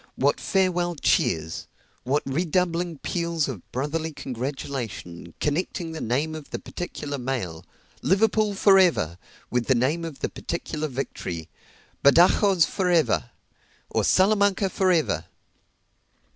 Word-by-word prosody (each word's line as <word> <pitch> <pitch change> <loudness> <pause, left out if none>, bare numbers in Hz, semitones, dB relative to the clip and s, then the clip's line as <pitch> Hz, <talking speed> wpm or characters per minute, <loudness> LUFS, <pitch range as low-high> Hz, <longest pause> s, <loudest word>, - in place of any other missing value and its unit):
what - - +2
farewell 180 -2 +1
cheers 80 - 0 0.4
what 140 +4 +1
redoubling 170 +3 0
peals 170 0 -1
of 120 -10 -5
brotherly 155 +5 -2
congratulation, 125 - -5
connecting 165 +2 -1
the 160 - -6
name 140 +7 0
of 155 -2 -8
the - - -4
particular 145 -5 -5
mail 115 -11 -3 0.4
"Liverpool 210 +1 +2
for 195 0 +6
ever!" 90 - +2 0.3
with 125 -1 0
the 130 - +4
name 140 +8 +1
of 160 -4 -7
the - - -1
particular 155 -2 -4
victory 90 - -5 0.6
"Badajoz 175 +4 +5
for 185 +3 -1
ever!" 160 -7 +2 0.6
or - - +1
"Salamanca 200 0 +3
for 185 0 +2
ever!" 150 - +1
155 Hz, 120 wpm, -25 LUFS, 130-180 Hz, 0.6 s, for